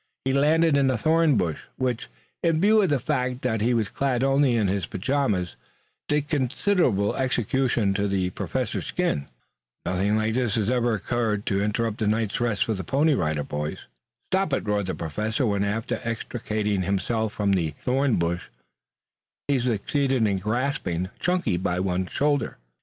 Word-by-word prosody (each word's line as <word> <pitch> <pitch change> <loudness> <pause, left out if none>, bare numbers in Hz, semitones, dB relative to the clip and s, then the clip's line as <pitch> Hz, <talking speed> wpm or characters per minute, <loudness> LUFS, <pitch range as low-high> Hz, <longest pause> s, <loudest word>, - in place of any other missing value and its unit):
He 135 - +1
landed 155 +3 +4
in 140 -1 +3
a 130 - +1
thorn 160 +1 +3
bush, 85 -5 -2
which, 125 -2 -2 0.3
in 165 -2 +2
view 215 +4 +5
of 190 - +2
the 145 - +3
fact 125 +1 -1
that 115 -4 0
he 120 +3 +2
was 110 -3 0
clad 130 -2 0
only 135 -2 +3
in 110 -3 +2
his 95 -2 -1
pajamas, 100 -5 -1 0.5
did 150 0 0
considerable 135 - +1
execution 125 -4 +1
to 100 +1 0
the 95 -2 0
Professor's - - -3
skin. 70 -1 -1 0.6
Nothing 95 +4 +1
like 110 +1 0
this 120 -4 0
had 110 0 +1
ever 120 -2 +2
occurred 110 0 -1
to 100 0 +1
interrupt 105 +1 -1
a 110 - +2
night's 110 +1 0
rest 115 -4 +1
for 110 - 0
the 95 -2 -4
Pony 145 - +2
Rider 75 - 0
Boys. 75 +2 -4 0.5
"Stop 190 -5 +1
it!" - - 0
roared 105 -2 0
the 95 - -2
Professor, 105 - -2
when, 100 -2 +1
after 105 +2 -2
extricating 110 -3 -2
himself 105 +4 -1
from 100 -1 0
the 85 -5 +1
thorn 130 0 +1
bush, 85 +1 -1 1.0
he 140 -2 +2
succeeded 125 +2 +1
in 100 -2 +1
grasping 105 - -1
Chunky 180 - +1
by 90 0 -1
one 90 0 -1
shoulder. 145 0 0
115 Hz, 170 wpm, -25 LUFS, 100-135 Hz, 1.0 s, view